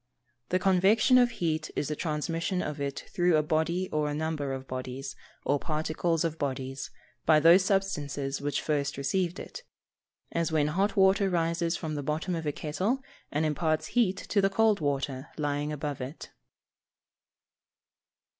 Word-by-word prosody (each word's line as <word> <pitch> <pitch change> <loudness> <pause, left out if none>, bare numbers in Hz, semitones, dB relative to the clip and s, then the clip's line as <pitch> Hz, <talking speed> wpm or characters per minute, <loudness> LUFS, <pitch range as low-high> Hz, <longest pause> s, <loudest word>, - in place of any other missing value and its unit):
_ - - -45
The 185 - +2
convection 195 +7 +4
of 245 -1 +5
heat 160 -8 -2
is 145 - -1
the 150 - -2
transmission 165 +4 -1
of 150 -1 -4
it 140 -1 -3
through 175 -2 +3
a 155 - +2
body 165 +4 0
or 150 -1 0
a 145 - -2
number 155 -3 -2
of 135 0 -5
bodies, 130 +1 -5 0.3
or 145 0 +2
particles 160 +2 -1
of 165 -1 -2
bodies, 135 -1 -3 0.4
by 155 -1 +7
those 170 +4 +7
substances 145 -9 -1
which 145 0 -1
first 140 -3 -1
received 175 +6 0
it; - - -8 0.7
as 170 -1 0
when 150 -2 +2
hot 195 +7 +1
water 195 +1 +4
rises 170 0 0
from 160 -3 -4
the 145 - -2
bottom 155 +6 -2
of 165 -2 -3
a - - +2
kettle 190 - -2 0.3
and 150 +2 +1
imparts 155 +1 0
heat 210 -6 +3
to 200 +1 0
the 195 - +3
cold 215 +1 +3
water 140 -2 -2
lying 145 0 -1
above 145 -2 -4
it. 130 +5 -7
155 Hz, 165 wpm, -29 LUFS, 145-185 Hz, 0.7 s, by